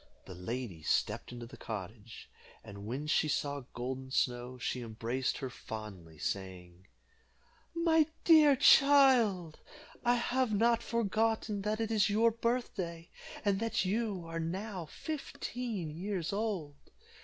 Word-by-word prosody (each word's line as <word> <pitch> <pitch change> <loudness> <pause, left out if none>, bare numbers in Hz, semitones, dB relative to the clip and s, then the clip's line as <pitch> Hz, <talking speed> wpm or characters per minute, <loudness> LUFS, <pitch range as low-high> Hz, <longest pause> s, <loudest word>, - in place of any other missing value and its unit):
The - - -9
lady 90 0 -5
stepped - - 0
into 120 -1 -7
the 120 +1 -12
cottage, 110 +1 -7 0.4
and 100 -2 -9
when 135 +6 -3
she 155 0 +2
saw 140 -2 -2
Golden 130 +2 -4
Snow, 125 -1 -1
she 125 0 -3
embraced 120 +3 -2
her 135 - -4
fondly, 100 -10 -8
saying, 90 +1 -5 0.9
"My 325 -2 +4 0.2
dear 305 -4 +7
child, 255 - +5 0.4
I 245 0 +4
have 245 -1 0
not 230 +2 +3
forgotten 220 -2 0
that 210 +2 -1
it 225 0 -1
is 215 -2 +3
your 225 +3 +4
birthday, 215 -8 -3 0.3
and 200 -1 +2
that 225 -3 0
you 200 -3 -1
are 165 0 -4
now 185 +1 -4
fifteen 245 - -5
years 180 +1 -3
old." 195 -9 -2
170 Hz, 130 wpm, -32 LUFS, -, 0.9 s, dear